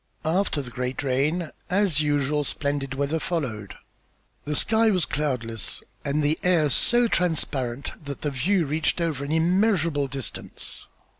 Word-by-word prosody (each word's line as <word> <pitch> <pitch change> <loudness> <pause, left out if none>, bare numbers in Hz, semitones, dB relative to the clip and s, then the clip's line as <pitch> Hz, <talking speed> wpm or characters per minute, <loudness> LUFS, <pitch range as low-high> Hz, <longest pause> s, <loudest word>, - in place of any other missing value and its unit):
After 160 -3 +1
the 125 - -7
great 125 +3 -3
rain, 150 +6 0 0.2
as 185 -5 +2
usual, 145 0 +1
splendid 140 -2 -2
weather 140 +4 0
followed. 130 - -3 0.7
The 150 +1 -1
sky 220 +7 +3
was 185 -6 +2
cloudless, 125 -7 -2 0.2
and 145 +2 0
the 150 +2 +2
air 165 -5 +3
so 240 - +4
transparent 140 - -1
that 140 -1 -6
the 150 - 0
view 170 +7 +2
reached 150 +3 0
over 160 -5 -1
an 140 - -4
immeasurable 170 -3 +2
distance. 135 -4 -5
150 Hz, 140 wpm, -25 LUFS, 135-170 Hz, 0.7 s, so